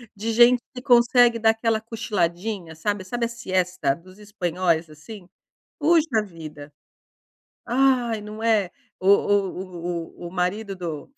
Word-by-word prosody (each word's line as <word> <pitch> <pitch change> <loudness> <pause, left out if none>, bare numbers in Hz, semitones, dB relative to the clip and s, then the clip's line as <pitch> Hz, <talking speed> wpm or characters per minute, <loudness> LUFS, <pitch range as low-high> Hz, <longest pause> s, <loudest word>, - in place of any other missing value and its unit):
de 220 +3 -3
gente 240 +1 +6
que 250 - -7
consegue 240 -2 +5
dar 220 0 +4
aquela 225 0 0
cochiladinha, 205 -5 -3
sabe 200 +4 -2
sabe 240 +5 -2
a - - -1
siesta 185 - -1
dos 185 +3 -17
espanhóis, 180 -5 -1
assim? 180 +5 -12 0.5
Puxa 305 -7 +3
vida! 155 -6 -10 1.0
Ai, 245 -3 +2
não 210 +1 -9
é? 215 -5 +2 0.3
O 185 - 0
o 180 -4 0
o - - -5
o - - -12
marido 190 +3 -2
do 165 - -6
205 Hz, 135 wpm, -23 LUFS, 175-230 Hz, 1.0 s, gente